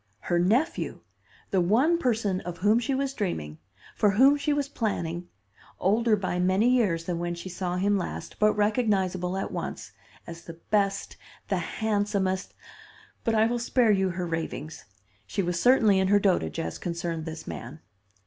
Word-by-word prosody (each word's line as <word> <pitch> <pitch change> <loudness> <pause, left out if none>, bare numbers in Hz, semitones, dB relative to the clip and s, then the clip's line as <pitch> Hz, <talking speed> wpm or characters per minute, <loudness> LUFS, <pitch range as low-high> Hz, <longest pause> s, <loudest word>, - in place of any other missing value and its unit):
Her 175 - 0
nephew! 230 - 0 0.5
the 190 - +3
one 255 - +3
person 220 - 0
of 175 0 -6
whom 210 +5 +3
she 265 +3 -1
was 270 0 -1
dreaming, 80 - -3 0.4
for 210 - +3
whom 260 +8 +5
she 290 +1 -1
was 290 -1 0
planning, 175 - -3 0.5
older 220 +3 +3
by 185 -3 -2
many 185 +5 +3
years 210 -10 +2
than 170 0 -3
when 175 0 -2
she 170 +2 -7
saw 180 0 -3
him 200 +2 +2
last, 180 - -6
but 215 0 +4
recognizable 195 -4 +1
at 195 - -3
once, - - -5 0.3
as 170 0 -10
the 165 0 -10
best, 200 -2 0 0.3
the - - +1
handsomest 205 -3 -1 0.7
but 225 -2 +1
I 220 0 +4
will 240 +1 0
spare 235 -1 +3
you 190 -2 +2
her 180 0 -3
ravings. 160 -2 -5 0.4
She 195 - -1
was 175 -1 -1
certainly 225 -6 +5
in 190 - +2
her 205 +1 +5
dotage 185 - +1
as 80 0 -4
concerned 170 -2 -3
this 160 -1 -7
man. - - -7
195 Hz, 170 wpm, -27 LUFS, 175-225 Hz, 0.7 s, whom